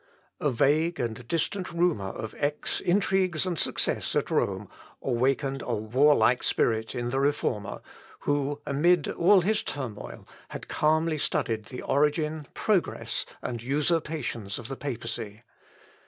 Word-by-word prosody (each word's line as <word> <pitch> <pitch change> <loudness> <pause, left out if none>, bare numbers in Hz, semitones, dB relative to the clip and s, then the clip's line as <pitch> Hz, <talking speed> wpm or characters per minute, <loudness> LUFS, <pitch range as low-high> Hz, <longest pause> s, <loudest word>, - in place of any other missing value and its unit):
A 150 - +1
vague 150 +7 +2
and 120 0 -3
distant 170 +6 -1
rumour 170 - +1
of 110 +3 -6
Eck's 145 +1 0
intrigues 185 -2 +2
and 175 -3 -2
success - - 0
at - - 0
Rome - - 0 0.3
awakened 135 +2 0
a 120 - -1
warlike 125 +2 +4
spirit 110 -1 +1
in 120 0 -2
the 135 - +1
Reformer, 135 -8 -1 0.4
who, 145 0 0
amid 155 +3 +3
all 185 +2 +5
his 210 +4 +1
turmoil, 115 -7 -6 0.2
had - - -7
calmly 155 +1 +2
studied 115 -8 -1
the 125 - -7
origin, 150 +1 +1
progress, 205 -5 0 0.2
and 120 -2 -3
usurpations 145 - -1
of 120 +1 -8
the 135 - -3
papacy. 115 -5 -5
145 Hz, 130 wpm, -27 LUFS, 120-160 Hz, 0.4 s, all